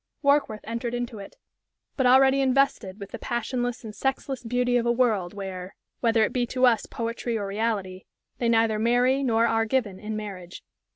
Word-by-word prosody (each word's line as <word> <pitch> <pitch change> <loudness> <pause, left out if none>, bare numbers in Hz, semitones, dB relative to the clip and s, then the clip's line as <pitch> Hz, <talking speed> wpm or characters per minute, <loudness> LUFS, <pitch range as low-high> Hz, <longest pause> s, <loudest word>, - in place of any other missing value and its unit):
Warkworth 280 -7 +2
entered 235 +1 -3
into 240 -3 -4
it, 195 - -10 0.6
but 260 -3 +2
already 265 +2 +5
invested 260 -7 +1
with 200 - -9
the - - -7
passionless 245 +1 -3
and 215 -2 -7
sexless 270 +1 -2
beauty 245 +1 0
of 240 -1 +2
a - - +4
world 220 -7 +1
where 190 -2 -6 0.2
whether 230 -2 +3
it - - 0
be 245 -1 0
to 255 +1 +2
us 230 -4 +3
poetry 230 0 -3
or 205 - -3
reality 195 -3 -2 0.3
"they 235 - +1
neither 225 -2 +2
marry 245 +4 +3
nor 230 -3 +2
are 225 -1 +2
given 215 -6 -1
in 215 0 -5
marriage." 190 -4 -7
230 Hz, 180 wpm, -26 LUFS, 210-250 Hz, 0.6 s, already